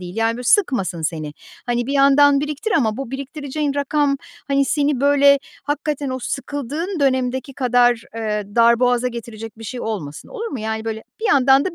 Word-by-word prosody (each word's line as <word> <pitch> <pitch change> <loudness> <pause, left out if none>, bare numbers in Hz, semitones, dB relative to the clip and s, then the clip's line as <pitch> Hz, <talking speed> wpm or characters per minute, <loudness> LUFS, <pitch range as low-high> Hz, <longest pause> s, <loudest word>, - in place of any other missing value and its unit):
değil. 180 +2 -8
Yani, 225 0 +1
böyle 250 - -6
sıkmasın 235 - +2
seni. 155 -2 -3 0.3
Hani, 240 0 0
bir 275 - -2
yandan 280 0 +5
biriktir 300 +9 -3
ama 220 -8 +2
bu 270 -3 -5
biriktireceğin 280 +1 -3
rakam, 285 0 +1 0.3
hani, 275 0 +3
seni 285 -2 0
böyle 280 0 +5 0.2
hakikaten 290 -1 -2
o 260 - -3
sıkıldığın 290 +7 -4
dönemdeki 260 0 0
kadar, 245 -2 +3
eee, 215 -2 -2
darboğaza 240 +1 +4
getirecek 225 -2 -8
bir 225 - -9
şey 245 +3 -5
olmasın, 165 -10 -5
olur 465 -2 -5
mu? 275 - -5
Yani, 220 0 -3
böyle 220 -1 -4 0.2
bir - - -5
yandan 270 -2 +5
da 365 -2 -3
260 Hz, 175 wpm, -20 LUFS, 230-285 Hz, 0.3 s, yandan